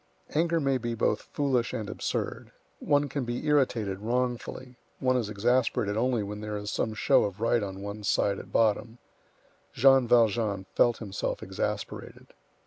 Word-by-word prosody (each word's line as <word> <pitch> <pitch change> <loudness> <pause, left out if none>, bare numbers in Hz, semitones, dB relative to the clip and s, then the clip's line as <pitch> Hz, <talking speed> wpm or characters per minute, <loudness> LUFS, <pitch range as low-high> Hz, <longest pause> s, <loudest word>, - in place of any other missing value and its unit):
Anger 165 +2 +2
may 135 -3 +1
be 120 0 -3
both 110 -1 +1
foolish 130 -5 -1
and 110 - -3
absurd; - - -4 0.3
one 145 -1 +2
can 140 -1 -3
be 120 0 -4
irritated 120 -10 +1
wrongfully; 125 +2 -3 0.2
one 130 -1 +1
is 115 -5 0
exasperated 115 0 +1
only 120 -1 +1
when 105 +1 -6
there 105 0 -4
is 105 0 -5
some 110 - -1
show - - +4
of 100 0 -4
right 115 +1 +2
on 95 -1 -5
one's 100 0 -4
side 100 -1 +1
at - - -11
bottom. 115 +1 +1 0.8
Jean 135 0 +5
Valjean 110 -4 +2
felt 120 -1 +3
himself 100 -4 -4
exasperated. - - -5
115 Hz, 155 wpm, -28 LUFS, 105-130 Hz, 0.8 s, Jean